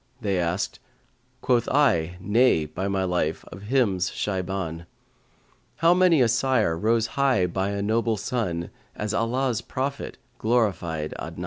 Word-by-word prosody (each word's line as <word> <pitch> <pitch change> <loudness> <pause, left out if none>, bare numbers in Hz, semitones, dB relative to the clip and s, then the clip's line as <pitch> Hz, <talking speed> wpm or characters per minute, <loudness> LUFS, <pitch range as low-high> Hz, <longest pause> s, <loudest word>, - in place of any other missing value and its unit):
they 100 -6 0
asked; 85 +2 -2 0.3
* 125 +1 -41
Quoth 120 -2 +2
I, 90 - +2
Nay, 105 -3 +3
by 90 +6 -4
my 95 -1 0
life, 90 -4 -1
of 95 - -9
him's 105 -6 +1
Shaybαn: 95 -4 -3 0.9
How 165 +1 +4
many 180 -6 +4
a - - +3
sire 120 -7 +2
rose 110 +6 +1
high 130 -5 +2
by 95 +2 -1
a 100 0 -2
noble 110 +1 +1
son, 95 -6 -3
* - - -34
As 105 0 -3
Allah's 120 +1 0
prophet 135 +2 -4 0.2
glorified 90 -9 0
Adnan!' 85 +2 -7
105 Hz, 145 wpm, -25 LUFS, 90-125 Hz, 0.9 s, How